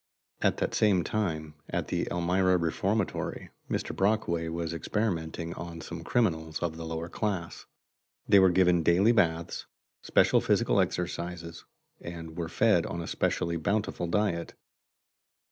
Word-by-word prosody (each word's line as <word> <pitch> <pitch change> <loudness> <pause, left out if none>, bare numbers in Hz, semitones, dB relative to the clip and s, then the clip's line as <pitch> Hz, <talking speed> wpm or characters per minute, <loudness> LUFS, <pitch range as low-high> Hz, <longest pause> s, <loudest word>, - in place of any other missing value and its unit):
At - - +2
that - - -1
same 100 -5 +3
time, 80 -8 -2 0.2
at - - -2
the - - -1
Elmira 90 +1 +2
Reformatory 95 +5 -1 0.2
Mr. - - -2
Brockway 95 -5 +1
was 85 0 -3
experimenting 85 -3 -2
on 85 0 -7
some 85 0 -7
criminals 80 -10 0
of 85 -2 -2
the 80 0 -6
lower 80 +1 -4
class. 95 -3 -3 0.6
They 100 -1 +7
were 95 0 +6
given 90 -1 +4
daily 90 +7 +4
baths, 85 -6 0 0.3
special - - +4
physical - - +2
exercises, 85 -1 -3 0.4
and 80 -1 -7
were 85 -2 -3
fed 105 -4 +3
on 85 - -4
a 85 - -4
specially 85 0 -1
bountiful 100 0 -1
diet. 85 -2 -1
85 Hz, 135 wpm, -29 LUFS, 85-95 Hz, 0.6 s, They